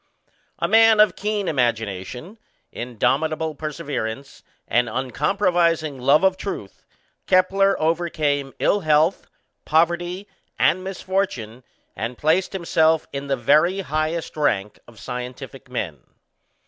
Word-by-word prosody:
A - - -1
man 225 -1 +6
of 215 - +5
keen 210 -2 -2
imagination, 120 - -2 0.3
indomitable 155 +7 -1
perseverance, 140 -4 -5 0.3
and 120 0 +1
uncompromising 160 - 0
love 140 +7 +4
of 190 -1 +3
truth, 185 - -7 0.4
Kepler 195 +1 +3
overcame 155 -4 0
ill 205 - +2
health, 155 +1 +2 0.4
poverty, 175 +4 0 0.3
and 185 +1 +2
misfortune, 185 - -3 0.3
and 115 +5 -4
placed 165 +6 +1
himself 160 -3 +2
in 140 0 -5
the 135 -1 0
very 155 +10 +3
highest 155 0 -2
rank 105 -9 -1
of 115 -3 -16
scientific 125 +1 -7
men. 85 - -4
155 Hz, 110 wpm, -22 LUFS, 125-185 Hz, 0.4 s, man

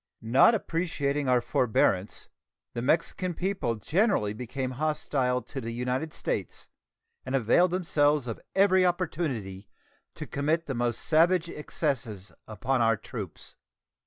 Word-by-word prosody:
Not 130 - +5
appreciating 145 -7 -1
our 125 -1 +4
forbearance, 105 -5 +1 0.5
the 120 - -3
Mexican 165 +5 0
people 185 -11 -1
generally 150 - +1
became 125 +3 -4
hostile 130 -3 -1
to 135 - -7
the 115 - -5
United 125 +6 -2
States, - - -4 0.6
and 130 +1 -2
availed 135 +9 +4
themselves 150 -6 +1
of 115 -3 -5
every 190 -1 +5
opportunity 150 - -2 0.5
to - - -6
commit 155 +4 -1
the 135 - -3
most 120 -1 -1
savage 170 +2 +3
excesses 125 - -3 0.2
upon 125 +4 -1
our 115 -1 +3
troops. 105 -5 -8
135 Hz, 125 wpm, -28 LUFS, 120-165 Hz, 0.6 s, Not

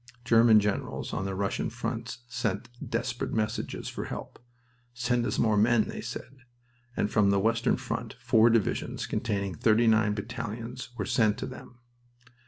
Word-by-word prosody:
German 115 -2 +6
generals 105 -1 -2
on 95 - -2
the 95 -1 -3
Russian 100 +1 -1
fronts 125 - -5
sent 120 -1 -2
desperate 120 -1 -2
messages 110 -1 -2
for - - -4
help. - - -7 0.6
"Send 120 0 +1
us - - -1
more 110 -2 +3
men," 110 +1 +4
they - - -5
said, 135 - -7 0.6
and 105 - 0
from 105 -2 +4
the 100 0 +3
western 115 +3 +2
front - - -4
four 115 +1 +4
divisions 115 -2 0
containing 100 -4 -2
thirty 110 +7 +3
nine 110 -2 +4
battalions 115 +2 -5
were 105 - -2
sent 110 -2 +2
to - - -4
them. 125 -1 -11
115 Hz, 155 wpm, -28 LUFS, 105-120 Hz, 0.6 s, German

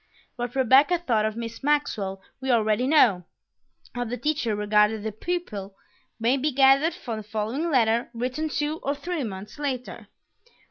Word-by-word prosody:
What 245 0 -5
Rebecca 270 +7 +5
thought 235 -11 0
of 215 0 -2
Miss 230 -1 -6
Maxwell 210 -10 -1 0.2
we 265 - -3
already 225 +1 +2
know; 235 - +4 0.7
how 245 - -2
the 245 +1 -4
teacher 295 -8 -1
regarded 210 +1 +2
the 220 - -2
pupil 215 - -4 0.4
may 235 +4 +2
be 295 +3 0
gathered 275 +4 +4
from 230 -3 -5
the 215 - -6
following 220 +10 -2
letter 235 -4 +2
written 255 +6 -3
two 300 +2 -2
or 280 +2 -1
three 325 +1 -3
months 205 +3 -7
later. 260 -4 -4
245 Hz, 155 wpm, -25 LUFS, 215-290 Hz, 0.7 s, Rebecca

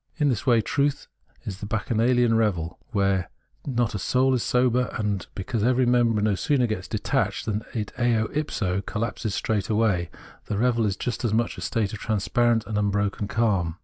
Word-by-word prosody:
In 150 -3 +2
this 120 -2 -2
way 120 -3 +5
truth 140 +5 0 0.4
is 95 -2 -6
the 105 - -6
bacchanalian 115 +2 +2
revel, 90 -7 0
where 100 -5 +1 0.4
not 120 -4 0
a 100 - -3
soul 130 +7 +2
is 125 - +1
sober; 125 +1 +2
and 105 -4 -2
because 100 +3 -2
every 125 +2 +3
member 120 -3 +3
no 105 -1 +3
sooner 125 - +1
gets 110 -5 -3
detached - - -1
than 105 -1 -1
it 105 -3 -3
60 - - -7 0.3
ipso 105 -11 -1
collapses 105 0 -3
straightway, 105 -4 0 0.4
the 105 - -2
revel 115 -1 +2
is 100 -1 -2
just 125 +1 -3
as 110 -2 +1
much 115 +1 0
a - - -9
state 110 -4 -1
of 105 - -5
transparent 115 +2 +1
imbroken 105 -1 -1
calm. 100 -8 +1
110 Hz, 175 wpm, -25 LUFS, 100-120 Hz, 0.4 s, way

